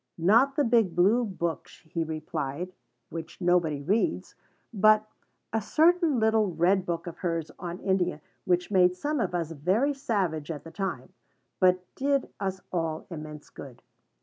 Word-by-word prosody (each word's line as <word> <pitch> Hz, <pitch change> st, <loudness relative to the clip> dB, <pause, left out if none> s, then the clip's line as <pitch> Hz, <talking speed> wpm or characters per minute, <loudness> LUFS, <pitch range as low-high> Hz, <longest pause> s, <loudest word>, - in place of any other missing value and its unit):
Not 230 Hz, +11 st, +4 dB
the 290 Hz, -, +3 dB
big 225 Hz, -8 st, +3 dB
Blue 205 Hz, +8 st, +4 dB
book, 170 Hz, -6 st, -3 dB, 0.2 s
he 165 Hz, 0 st, -3 dB
replied, 155 Hz, +1 st, -4 dB, 0.4 s
which 165 Hz, 0 st, -7 dB
nobody 175 Hz, -5 st, +1 dB
reads, 220 Hz, -, 0 dB, 0.4 s
but 215 Hz, +1 st, +5 dB, 0.5 s
"a 225 Hz, -, +1 dB
certain 320 Hz, -, +3 dB
little 220 Hz, -4 st, +2 dB
red 185 Hz, +3 st, +2 dB
book 170 Hz, -1 st, -2 dB
of 175 Hz, -, -7 dB
hers 165 Hz, -4 st, -2 dB
on 175 Hz, -1 st, -5 dB
India 180 Hz, -4 st, 0 dB, 0.2 s
which 180 Hz, +1 st, 0 dB
made 180 Hz, -2 st, +4 dB
some 295 Hz, +9 st, -2 dB
of 200 Hz, -, -1 dB
us 165 Hz, -2 st, -2 dB
very 190 Hz, -, +1 dB
savage 185 Hz, -, -1 dB
at 150 Hz, -4 st, -5 dB
the 165 Hz, -, -10 dB
time, 175 Hz, -11 st, -4 dB, 0.5 s
but 185 Hz, 0 st, +3 dB
did 275 Hz, 0 st, 0 dB
us 190 Hz, -1 st, -3 dB
all 165 Hz, -2 st, -2 dB
immense 150 Hz, -2 st, -8 dB
good." 130 Hz, -4 st, -11 dB
180 Hz, 150 wpm, -28 LUFS, 165-215 Hz, 0.5 s, but